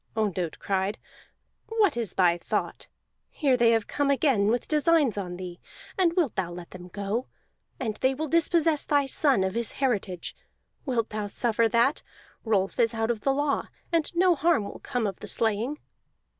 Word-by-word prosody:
Ondott 185 -6 -1
cried: 195 +2 -1 0.7
"What 440 - +2
is 235 -4 -2
thy 175 -2 +4
thought? 175 - -3 0.4
Here 275 -5 +1
they 235 -2 +4
have 225 -2 +2
come 285 -1 -1
again 270 -7 +3
with 240 +3 0
designs 305 - +3
on 180 -3 -4
thee, 180 -1 -7 0.4
and 355 -3 +2
wilt 340 - +1
thou 175 - -2
let 175 0 -9
them 180 -1 -10
go? 205 +6 -3 0.5
And 220 -5 -3
they 265 +1 +1
will 310 +3 -3
dispossess 325 -1 +2
thy 285 -1 +2
son 270 -5 +2
of 190 0 -1
his 235 0 -1
heritage; 205 -9 -2 0.5
wilt 235 -4 0
thou 210 -1 -3
suffer 230 +2 +1
that? 235 +5 +2 0.4
Rolf 205 -1 0
is 230 -1 +2
out 225 +1 0
of 225 -3 -4
the 275 - +2
law, 285 +1 0 0.2
and 330 -2 +1
no 360 +1 +5
harm 325 -5 +2
will 200 - -8
come 245 -5 -2
of 195 -3 -3
the - - -8
slaying." 225 +6 0
235 Hz, 175 wpm, -27 LUFS, 200-285 Hz, 0.7 s, no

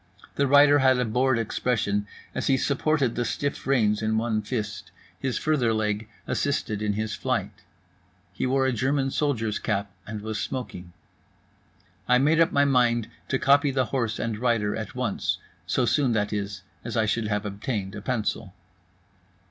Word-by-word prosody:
The 140 - +1
rider 145 +1 +6
had 130 -1 +4
a 125 - +1
bored 125 +3 +2
expression 105 -2 0 0.3
as - - -2
he 135 - +4
supported 140 -2 +1
the 120 - -1
stiff 140 +6 -3
reins 110 -6 +2
in 110 0 +1
one 110 -1 0
fist. 105 -3 -4 0.3
His 130 -4 -1
further 130 -8 +1
leg 105 0 -1 0.2
assisted 110 -7 -1
in 105 -1 0
his 110 +1 -2
flight. - - -2 0.7
He - - -1
wore 135 +1 +2
a 130 - +1
German 135 +2 0
soldier's 115 -9 0
cap 100 -1 -2 0.2
and 105 0 -5
was 110 -1 -3
smoking. 95 -9 -5 1.2
I 125 - +5
made 150 +5 +3
up 165 - +4
my 140 0 +4
mind 120 -4 +2 0.2
to 130 - +1
copy 140 +2 +4
the 130 -1 +1
horse 115 -4 0
and 110 -2 -3
rider 115 -4 +1
at 110 +2 -6
once, 125 -5 -1 0.3
so 125 +6 +1
soon, 130 -1 +2
that 105 -1 0
is, 100 -2 -4 0.2
as 120 0 -4
I 110 - +3
should 110 0 0
have 105 0 -1
obtained 100 -1 -3
a 105 - -6
pencil. 105 -4 -2
115 Hz, 170 wpm, -26 LUFS, 105-130 Hz, 1.2 s, rider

